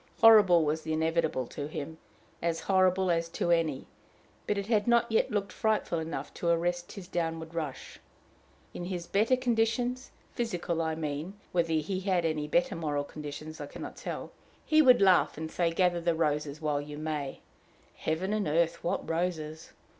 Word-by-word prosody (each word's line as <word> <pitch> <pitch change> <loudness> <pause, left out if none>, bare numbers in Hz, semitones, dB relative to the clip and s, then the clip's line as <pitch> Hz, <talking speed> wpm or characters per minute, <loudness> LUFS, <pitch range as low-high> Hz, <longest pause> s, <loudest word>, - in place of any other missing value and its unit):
Horrible 205 -7 +7
was 155 +2 0
the 160 0 -3
inevitable 160 -4 0
to 145 +4 -6
him, 160 +1 -6 0.4
as 165 -1 -1
horrible 185 -1 +3
as 165 0 0
to 175 - -1
any; 160 -5 +1 0.6
but 210 - 0
it 200 - -2
had 215 -1 +1
not 235 -1 +3
yet 225 - +2
looked 200 -2 -2
frightful 215 -6 0
enough 160 +1 -5
to 170 - -2
arrest 175 +1 0
his 195 -4 -9
downward 165 -2 -3
rush. 155 -5 -5 0.7
In 175 - -5
his 175 -2 -4
better 215 +8 +3
conditions 245 +1 0 0.2
physical, 175 -8 -2
I 160 -1 -1
mean 155 +4 -4 0.2
whether 165 -2 +1
he 160 +5 -1
had 185 -3 +1
any 155 -2 -1
better 260 +5 +1
moral 150 -3 -1
conditions, 150 +1 -8
I 145 - -5
can - - -9
not - - -7
tell - - -6 0.3
he 310 0 +5
would 250 -7 +6
laugh 185 -5 +4
and 160 0 -5
say, 170 -2 +1
"Gather 175 0 +1
the 170 -1 +1
roses 150 -2 -1
while 150 -2 0
you 145 0 -8
may" 150 -3 -4 0.5
heaven 180 +6 -2
and 215 -2 0
earth! 165 +2 +1
what 180 +3 -2
roses! 165 -2 -3
170 Hz, 175 wpm, -29 LUFS, 155-195 Hz, 0.7 s, Horrible